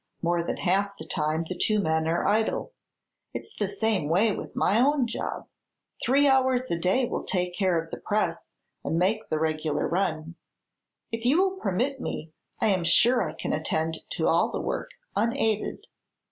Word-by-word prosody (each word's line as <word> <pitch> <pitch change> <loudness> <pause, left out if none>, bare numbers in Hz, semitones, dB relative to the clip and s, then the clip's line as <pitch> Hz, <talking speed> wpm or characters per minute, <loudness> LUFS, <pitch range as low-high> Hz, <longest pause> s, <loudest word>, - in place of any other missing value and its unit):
More 170 0 +2
than 170 - -3
half 200 +2 0
the - - -8
time 155 0 -1
the 185 - -4
two 215 +2 +1
men 160 -4 +1
are 170 +1 0
idle. 220 - +1 0.6
It's 440 - -7
the 205 - -1
same 205 -7 0
way 200 +5 +3
with - - -7
my 210 - +3
own 280 -1 +3
job. 235 - -4 0.6
Three 280 +3 +4
hours 260 -2 +3
a 170 - 0
day 190 +9 +2
will - - -2
take 180 -3 -1
care 185 -2 +2
of 165 0 -7
the - - -4
press 195 -5 -1 0.3
and 165 - -1
make 210 +5 +1
the 155 - 0
regular 155 -1 0
run. 165 -3 -1 0.8
If 230 0 -4
you 270 +8 +4
will 380 0 +2
permit 255 - -1
me, 155 +1 -5 0.3
I 220 - +2
am 185 -3 +2
sure 235 +9 +4
I - - -2
can - - -3
attend 160 +1 -1
to - - 0
all - - +3
the - - -3
work, - - -3 0.3
unaided." 225 -2 0
195 Hz, 180 wpm, -27 LUFS, 165-230 Hz, 0.8 s, Three